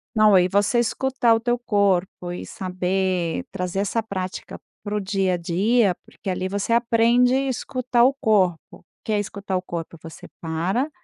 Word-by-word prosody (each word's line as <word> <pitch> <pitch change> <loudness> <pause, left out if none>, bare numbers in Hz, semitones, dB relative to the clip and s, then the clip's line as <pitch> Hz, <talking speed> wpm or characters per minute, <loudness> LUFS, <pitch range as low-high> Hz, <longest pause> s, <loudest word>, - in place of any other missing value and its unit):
Não, 215 -3 +6
e 180 - +4
você 205 +5 +2
escutar 240 0 +2
o - - 0
teu 240 +1 0
corpo 195 -5 0
e 175 - -6
saber 185 +1 -2
trazer 180 -1 -3
essa 205 +3 0
prática 190 -4 -6 0.2
para 205 0 -3
o 210 - +1
dia 195 -1 0
a 180 - 0
dia, 195 +4 +2
porque - - -8
ali 185 0 -2
você 200 +4 -1
aprende 235 +1 +3
escutar 255 -2 0
o 260 +3 +5
corpo. 210 -10 +2 0.2
O - - -14 0.2
que 220 - -4
é 210 - +2
escutar 200 -1 -4
o 180 - -2
corpo? 170 -2 -6
Você 165 -1 -11
para, 175 - -1
200 Hz, 175 wpm, -23 LUFS, 185-235 Hz, 0.2 s, Não